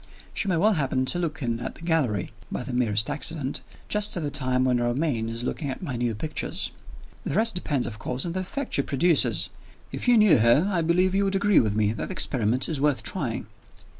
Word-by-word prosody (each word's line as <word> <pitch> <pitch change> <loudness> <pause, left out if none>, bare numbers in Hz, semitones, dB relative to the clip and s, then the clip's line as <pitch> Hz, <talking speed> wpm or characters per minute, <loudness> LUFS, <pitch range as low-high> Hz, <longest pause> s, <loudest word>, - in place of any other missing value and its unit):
She - - -2
may 180 -3 +1
well 210 +6 +4
happen 135 -5 0
to 175 +7 -1
look 160 -4 -3
in 115 -1 -1
at 120 - -5
the - - -13
gallery 135 - 0 0.2
(by - - -3
the 130 - -6
merest 110 -3 +1
accident) 145 -4 -2 0.3
just 210 -2 +1
at 170 - -3
the 145 - -2
time 130 -2 +2
when 125 -1 +2
Romayne 120 -1 0
is 115 +1 -4
looking 140 +3 -3
at 135 - -5
my 140 -8 -3
new 120 -2 -1
pictures. 155 +9 -3 0.5
The - - -3
rest 225 +1 +4
depends, 145 -8 0
of 110 -2 -6
course, 125 +6 -1
on, 170 - -2
the 185 - -2
effect 275 +10 -5
she - - +2
produces. 155 +4 +2 0.4
If - - -5
you 245 -1 +6
knew 210 - +6
her, 120 - +4
I 170 - +2
believe 180 +3 +2
you 200 +1 +2
would 195 0 0
agree 200 -1 +4
with 105 -2 +1
me 105 0 +2
that 115 - -4
the - - -5
experiment 125 0 0
is 150 -4 -3
worth 145 -2 +2
trying." - - -2
140 Hz, 225 wpm, -25 LUFS, 120-175 Hz, 0.5 s, you